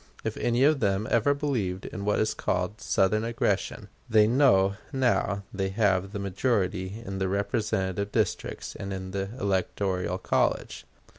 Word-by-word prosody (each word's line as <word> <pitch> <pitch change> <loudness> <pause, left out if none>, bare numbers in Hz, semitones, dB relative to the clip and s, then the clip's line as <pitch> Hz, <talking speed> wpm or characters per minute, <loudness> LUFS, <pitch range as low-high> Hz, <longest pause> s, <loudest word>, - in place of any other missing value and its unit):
If - - -2
any 120 +2 +1
of 150 0 +4
them 100 -1 +1
ever 115 +5 +3
believed 115 -11 -2
in 100 -2 -6
what 105 - +2
is 110 - +1
called 90 +4 -2
Southern 105 +3 +2
aggression, 115 0 -1 0.2
they 110 -2 +6
know 110 -6 +4 0.2
now 120 -7 +1
they 95 -1 -1
have 95 -2 +1
the 105 - -4
majority 100 -1 -1
in 95 0 -4
the 95 - 0
representative 100 -1 -1
districts 110 -5 -2
and 100 0 -6
in 95 -1 -5
the 95 0 -3
electoral 95 -2 -1
college. 95 - -1
100 Hz, 150 wpm, -27 LUFS, 95-110 Hz, 0.2 s, they